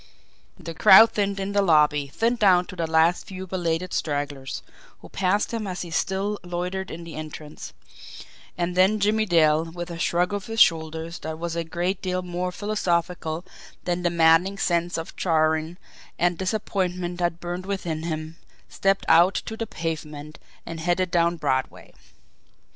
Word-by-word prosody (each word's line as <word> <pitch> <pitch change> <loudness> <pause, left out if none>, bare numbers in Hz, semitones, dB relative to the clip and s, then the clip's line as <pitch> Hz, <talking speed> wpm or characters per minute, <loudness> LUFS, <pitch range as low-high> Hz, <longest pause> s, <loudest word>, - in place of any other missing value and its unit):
The 165 -3 -7
crowd 220 +7 +8
thinned 200 -1 -1
in 195 +1 -3
the 200 0 +2
lobby, 150 -5 +3
thinned 230 - 0
down 185 -4 +5
to 185 - -10
the 165 -2 -2
last 160 +2 +3
few 190 -1 -7
belated 175 -1 -2
stragglers, 145 -3 -3 0.4
who - - -13
passed 195 +4 0
him 220 -3 -3
as 180 -1 -4
he 170 - -9
still 195 +5 -1
loitered 180 +2 -4
in 170 +1 -7
the 165 -1 -9
entrance; 155 -1 -8 0.9
and 175 0 -2
then 190 +4 +4
Jimmie 215 +2 +2
Dale, 160 -2 +4
with 175 +1 -7
a 165 - -7
shrug 175 +3 +1
of 205 -1 -4
his 225 0 -3
shoulders 160 -1 +2
that 160 0 -5
was 170 0 -4
a 170 - -1
great 175 +3 -2
deal 185 -1 -2
more 180 0 -3
philosophical 175 -4 -2 0.4
than 180 0 -1
the 175 - +1
maddening 170 +3 +4
sense 175 -2 0
of 165 - -6
chagrin 160 0 +1 0.4
and 175 +1 +2
disappointment 180 -2 -2
that 175 -1 -1
burned 175 +2 -5
within 175 -5 -3
him, 160 0 -5 0.3
stepped 195 0 0
out 170 +4 +5
to 220 - -4
the 225 0 -4
pavement 155 -3 -6 0.3
and 165 -1 -6
headed 175 +2 0
down 170 -1 +2
Broadway. 130 -4 -2
175 Hz, 165 wpm, -24 LUFS, 160-190 Hz, 0.9 s, crowd